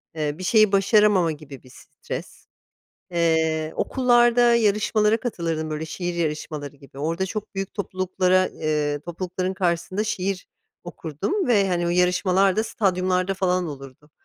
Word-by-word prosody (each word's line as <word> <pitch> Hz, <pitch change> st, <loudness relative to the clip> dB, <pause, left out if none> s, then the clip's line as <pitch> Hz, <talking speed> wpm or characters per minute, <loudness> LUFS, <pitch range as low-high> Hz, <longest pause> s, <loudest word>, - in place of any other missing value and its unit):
eee, 150 Hz, -1 st, -2 dB
bir 185 Hz, -, -7 dB
şeyi 215 Hz, +1 st, +4 dB
başaramama 200 Hz, -3 st, +4 dB
gibi 145 Hz, -3 st, -10 dB
bir 130 Hz, -, -17 dB
stres. -, -, -9 dB, 0.7 s
Eee, 160 Hz, -2 st, +1 dB
okullarda 240 Hz, -2 st, +4 dB
yarışmalara 215 Hz, 0 st, +2 dB
katılırdım 165 Hz, -9 st, -3 dB
böyle 155 Hz, +1 st, -4 dB
şiir 175 Hz, +2 st, -4 dB
yarışmaları 150 Hz, -3 st, -4 dB
gibi. 135 Hz, 0 st, -15 dB
Orada 165 Hz, +6 st, -1 dB
çok 205 Hz, +2 st, -6 dB
büyük 195 Hz, 0 st, -4 dB
topluluklara 185 Hz, -1 st, +1 dB
eee, 150 Hz, -2 st, -2 dB
toplulukların 185 Hz, +2 st, -4 dB
karşısında 185 Hz, +2 st, -1 dB
şiir 195 Hz, -2 st, -3 dB, 0.4 s
okurdum 175 Hz, -, -3 dB
ve, 205 Hz, -5 st, +3 dB
hani, 175 Hz, -1 st, 0 dB
o -, -, 0 dB
yarışmalar 180 Hz, +2 st, +2 dB
da 220 Hz, -, +1 dB
stadyumlarda 185 Hz, -2 st, 0 dB
falan 185 Hz, -2 st, 0 dB
olurdu. 135 Hz, 0 st, -10 dB
180 Hz, 135 wpm, -23 LUFS, 160-200 Hz, 0.7 s, şeyi